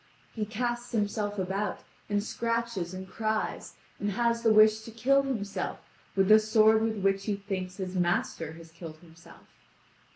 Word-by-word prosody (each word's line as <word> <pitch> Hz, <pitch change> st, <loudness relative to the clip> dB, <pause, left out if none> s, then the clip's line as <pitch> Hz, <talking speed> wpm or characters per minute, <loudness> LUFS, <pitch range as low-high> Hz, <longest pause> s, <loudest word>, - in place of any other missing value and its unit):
He 215 Hz, -2 st, -3 dB
casts 240 Hz, +2 st, -3 dB
himself 205 Hz, -1 st, -1 dB
about, 195 Hz, +2 st, -2 dB, 0.3 s
and 205 Hz, 0 st, +1 dB
scratches 230 Hz, -5 st, -2 dB
and 185 Hz, 0 st, -7 dB
cries, 215 Hz, +2 st, -2 dB, 0.2 s
and 205 Hz, 0 st, -1 dB
has 235 Hz, +1 st, +1 dB
the 225 Hz, -1 st, +4 dB
wish 215 Hz, 0 st, +6 dB
to 225 Hz, -, -10 dB
kill 255 Hz, +5 st, +3 dB
himself 205 Hz, -8 st, -3 dB, 0.4 s
with 195 Hz, -1 st, +3 dB
the 215 Hz, +1 st, +8 dB
sword 220 Hz, 0 st, +4 dB
with 220 Hz, -1 st, 0 dB
which 195 Hz, 0 st, +1 dB
he 210 Hz, -, 0 dB
thinks 190 Hz, -2 st, -5 dB
his 185 Hz, -2 st, -4 dB
master 175 Hz, -2 st, 0 dB
has 165 Hz, 0 st, -13 dB
killed 165 Hz, -1 st, -9 dB
himself. 165 Hz, 0 st, -17 dB
210 Hz, 160 wpm, -29 LUFS, 185-225 Hz, 0.4 s, the